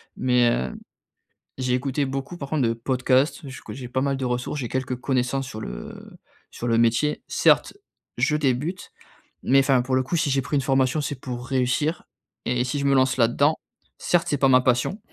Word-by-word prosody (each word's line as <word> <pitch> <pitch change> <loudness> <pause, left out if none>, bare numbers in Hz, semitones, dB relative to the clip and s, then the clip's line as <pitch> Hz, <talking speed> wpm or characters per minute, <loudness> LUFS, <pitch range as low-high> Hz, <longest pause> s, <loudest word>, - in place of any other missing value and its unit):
mais, 125 -2 +3
heu, 65 - -2 0.9
j'ai 125 -1 0
écouté 135 +2 0
beaucoup 135 +5 -4
par 140 -3 -7
contre 155 -4 +1
de - - +1
podcasts, 130 +5 0
je 130 - -9
que - - -9
j'ai 125 -1 -7
pas 130 +2 -1
mal 140 0 0
de 135 - -4
ressources, 125 +4 -2
j'ai 120 - -4
quelques 130 -1 -2
connaissances 130 +1 -1
sur 110 -4 -7
le - - -7 0.5
sur 120 - -6
le 115 0 +2
métier. 120 +6 +2
Certes, - - +3 0.4
je 150 - +2
débute, 150 +6 -1 0.5
mais 135 +1 +4
enfin, 135 -2 +3
pour 130 0 -1
le 130 - +3
coup 170 - -3
si 160 -2 +1
j'ai 135 - +2
pris 140 +3 -3
une 140 - +1
formation, 135 +2 +1
c'est 145 -2 -4
pour 125 -1 -6
réussir 135 +5 0 0.4
et 125 0 +1
si 125 +3 -2
je 140 - -2
me 140 0 +3
lance 130 0 +3
là-dedans, 130 +6 +3 0.4
certes 175 -1 +1
c'est 145 - +1
pas 135 - +4
ma 130 -1 +5
passion, 125 - +1
130 Hz, 200 wpm, -24 LUFS, 125-140 Hz, 0.9 s, ma